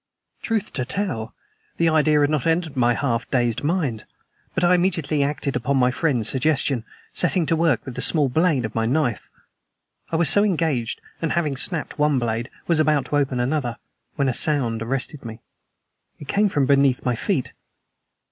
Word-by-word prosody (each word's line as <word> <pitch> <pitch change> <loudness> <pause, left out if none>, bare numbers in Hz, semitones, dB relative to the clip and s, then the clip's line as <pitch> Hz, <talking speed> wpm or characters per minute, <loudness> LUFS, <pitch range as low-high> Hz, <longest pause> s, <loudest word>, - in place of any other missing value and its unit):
Truth 220 -3 -2
to 130 - -2
tell, 130 - -4 0.4
the 170 - +2
idea 155 -1 +3
had 145 +1 +2
not 155 -1 0
entered 165 -2 0
my 120 -2 +2
half 115 -4 -2
dazed 120 -2 0
mind, 145 - -1 0.5
but 185 - 0
I 175 +1 +5
immediately 170 -5 +1
acted 140 -1 -1
upon 135 +3 0
my 125 -1 +3
friend's 125 -6 0
suggestion, 130 0 +1 0.3
setting 180 -1 +2
to 165 +1 +1
work 160 -6 +1
with 130 - -6
the - - -5
small 150 -4 +3
blade 145 -2 +1
of 110 - -6
my 115 0 0
knife. 130 -3 -1 0.8
I - - -1
was 165 0 +3
so 205 - +4
engaged, 160 - -1 0.2
and, 165 - -1
having 155 -5 0
snapped 155 +3 -2
one 150 -2 +3
blade, 120 0 -2 0.2
was 170 -2 +1
about 150 -3 +2
to 145 - +2
open 135 -3 0
another, 125 -2 -1 0.4
when 140 - 0
a 130 - +1
sound 120 -6 +1
arrested 135 +4 -3
me. 115 -1 -8 0.8
It 145 - -11
came 205 +5 +2
from 145 -7 +1
beneath 140 -2 +2
my 125 - +2
feet. 115 - -2
145 Hz, 180 wpm, -22 LUFS, 125-160 Hz, 0.8 s, I